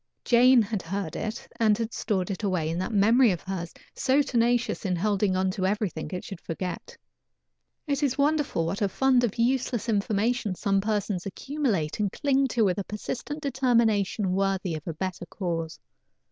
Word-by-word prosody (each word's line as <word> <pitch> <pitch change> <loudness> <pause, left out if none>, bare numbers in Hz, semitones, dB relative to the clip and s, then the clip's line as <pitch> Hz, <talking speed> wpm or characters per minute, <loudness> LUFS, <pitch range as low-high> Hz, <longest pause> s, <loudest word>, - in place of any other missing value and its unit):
Jane 245 0 +6
had 210 -1 -3
heard 180 -1 -4
it, 220 +1 -4
and 215 -2 +4
had 230 0 -3
stored 190 -3 -1
it 190 - -4
away 185 -6 0
in 170 - -2
that 185 - -2
memory 225 +4 +5
of 180 -4 -1
hers, 180 -3 -4 0.2
so 275 +3 +2
tenacious 240 -2 +1
in 185 -3 0
holding 200 +1 +1 0.2
to 185 0 -1
everything 195 -6 -2
it 180 - -5
should 195 -4 -8
forget. 180 +2 -5 0.9
It 285 -2 -1
is 275 -2 +1
wonderful 290 - +1
what 185 +6 -3
a 200 - +2
fund 260 +3 +3
of 230 -4 -1
useless 245 -1 0
information 215 0 0
some 195 +1 +1
persons 205 -3 -1
accumulate 210 - -2
and 205 -2 0
cling 275 -2 +1
to 235 -4 +1
with 190 +1 +1
a - - -2
persistent 260 +9 -5
determination 230 -7 +1
worthy 190 -2 0
of 155 +1 -6
a 165 - -2
better 185 0 -4
cause. 165 -4 -4
205 Hz, 175 wpm, -27 LUFS, 185-245 Hz, 0.9 s, Jane